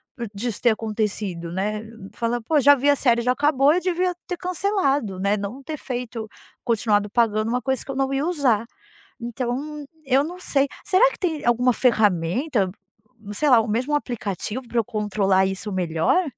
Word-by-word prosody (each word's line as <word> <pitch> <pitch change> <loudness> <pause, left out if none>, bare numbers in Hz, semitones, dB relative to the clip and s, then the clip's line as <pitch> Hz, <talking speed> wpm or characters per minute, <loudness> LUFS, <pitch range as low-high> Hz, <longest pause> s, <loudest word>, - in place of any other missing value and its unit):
p 235 -2 -5
disso 225 +1 -3
ter 240 - +4
acontecido, 210 -6 -3
né, 210 +4 -2 0.3
falo: 235 +1 -1
“Pô, 305 +4 +2
já 285 +2 +7
vi 280 +1 -1
a 285 - +5
série, 240 -4 +2
já 250 - +2
acabou, 285 +1 +3
eu 355 - +2
devia 360 0 0
ter 360 - -3
cancelado, 315 - 0
né, 200 +2 +1
não 205 +7 -6
ter 305 +2 -5
feito 240 -4 -5 0.4
continuado 210 -3 +1
pagando 220 -1 +1
uma 250 +1 0
coisa 265 -1 -1
que - - -22
eu - - -6
não 270 0 0
ia 275 +2 0
usar”. 255 -10 +1 0.6
Então 255 +5 -4 0.2
eu 270 +2 +3
não 355 +3 -7
sei, 275 -5 +1 0.2
será 415 +6 +4
que - - -11
tem 330 -6 -2
alguma 240 0 +3
ferramenta, 210 - +1 0.6
sei 300 +6 +1
lá, 245 -3 +7
ou 225 - -3
mesmo 245 +7 -1
um 295 - +4
aplicativo 230 - -4
pra 235 - -2
eu 230 - +2
controlar 200 -4 +1
isso 195 +2 -4
melhor? 180 - +1
240 Hz, 185 wpm, -23 LUFS, 210-285 Hz, 0.6 s, já